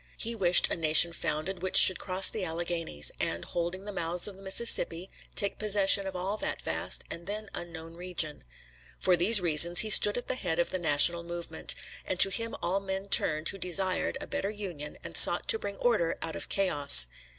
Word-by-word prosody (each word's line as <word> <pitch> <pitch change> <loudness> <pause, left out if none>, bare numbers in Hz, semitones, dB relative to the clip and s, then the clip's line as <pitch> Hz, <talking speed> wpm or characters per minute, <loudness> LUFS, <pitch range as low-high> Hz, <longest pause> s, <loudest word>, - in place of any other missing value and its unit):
He 230 - -3
wished 180 -5 +4
a - - -1
nation 165 +1 +2
founded 165 +3 -6
which 185 0 0
should 185 - +5
cross 185 0 +2
the 215 - -6
Alleghanies, 165 - -1
and, - - -5
holding 175 +3 -7
the 205 - -8
mouths 175 0 -5
of 205 - -12
the 195 - -18
Mississippi, 190 -3 +2 0.2
take 200 - -1
possession 200 -2 +2
of 190 - -9
all 190 +4 -5
that - - -6
vast - - -4
and 170 +1 -11
then 210 +1 -9
unknown 165 -1 -10
region. 170 -3 -5 0.6
For 185 - +1
these 195 +5 +4
reasons 170 +1 +4
he 215 - -1
stood 205 +1 +6
at 245 - -8
the - - -3
head 180 -10 -5
of 170 - -3
the 185 - -5
national 170 +1 +2
movement, 170 -1 -5 0.3
and 185 - -7
to 195 - +6
him 230 +4 -4
all 185 +3 -3
men 195 0 -8
turned 155 -3 +1
who 195 - -9
desired 185 +1 -3
a - - -8
better 195 - -6
union 180 -8 -10
and - - -10
sought - - +8
to 450 -2 +1
bring 200 - -9
order 210 -9 -3
out 165 -1 -6
of - - -9
chaos. 145 - +4
180 Hz, 200 wpm, -26 LUFS, 170-195 Hz, 0.6 s, sought